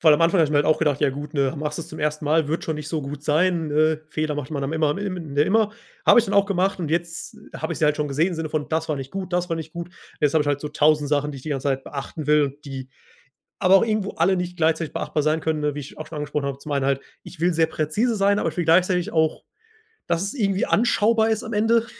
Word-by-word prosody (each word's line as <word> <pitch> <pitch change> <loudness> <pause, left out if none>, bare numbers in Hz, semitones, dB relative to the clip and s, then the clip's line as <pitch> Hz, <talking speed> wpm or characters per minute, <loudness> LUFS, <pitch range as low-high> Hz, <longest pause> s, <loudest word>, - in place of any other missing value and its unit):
weil 155 -2 +7
am 150 - -1
Anfang 170 +3 +3
habe 155 - +4
ich - - -6
mir 150 - +2
halt 145 - +3
auch 155 - +3
gedacht: 145 -3 +1
„Ja, 140 - +3
gut, 145 +3 -7
ne, 140 0 +1
machst 150 +2 -3
das 165 - -6
zum - - -9
1. 150 0 -1
Mal, 155 0 +2
wird 160 +2 -2
schon 160 - -2
nicht 150 0 -6
so 155 -2 -2
gut 140 +1 -7
sein. 160 +1 +1
Äh, 155 +1 +2
Fehler 155 -1 -2
macht 145 -3 -5
man 140 -3 -3
dann 135 - -2
immer 160 -1 +2
am 145 - -1
im 180 -8 -5
immer.“ 210 +9 +3 0.4
Habe - - +8
ich 235 - -3
dann 200 - -2
auch 200 0 +5
gemacht 195 0 0
und 160 -4 -3
jetzt 170 0 -3 0.2
habe - - -3
ich - - -5
sie 155 - +2
halt 150 0 +3
schon 150 -1 -1
gesehen 155 +6 +1
im 175 - -4
Sinne 160 -1 -3
von: 150 -1 -2
„Das 160 0 -1
war 155 - 0
nicht 135 0 -6
gut. 190 -2 -5
Das 180 0 0
war 165 - 0
nicht 160 -1 -7
gut. 170 +1 -6 0.3
Jetzt 150 0 +2
habe 155 - +4
ich 145 - -3
halt 145 -1 0
so 150 - -4
1.000 150 -1 +2
Sachen, 145 0 0
die - - -8
ich 130 - -10
die 155 - -5
ganze 140 0 -1
Zeit 135 0 -1
beachten 145 +2 -6
will, 145 -2 +2
die 135 -2 -7 0.7
aber 190 0 +5
auch - - +2
irgendwo 215 -3 -1
alle 180 +4 +3
nicht 180 -1 -4
gleichzeitig 160 -1 +1
beachtbar 150 - -1
sein 155 +1 +2
können, 160 -1 -1
ne, 150 0 0
wie 145 - -5
ich 140 - -10
auch 155 - -6
schon 155 - -7
angesprochen 150 -1 -2
habe. 140 -1 -3
Zum 150 - -8
einen 140 -1 +1
halt: 135 0 +1 0.2
Ich 175 - -12
will 175 +2 +2
sehr 160 0 +3
präzise 185 +10 0
sein, 200 0 +3
aber - - 0
ich - - -12
will 175 - 0
gleichzeitig 180 +1 +3
auch, 160 -1 +1 0.6
dass 170 +1 0
es 200 +8 -3
irgendwie 195 -6 0
anschaubar 225 0 +3
ist 220 -1 -1
am 220 - -6
Ende. 225 +2 +2
155 Hz, 290 wpm, -23 LUFS, 150-180 Hz, 0.7 s, Habe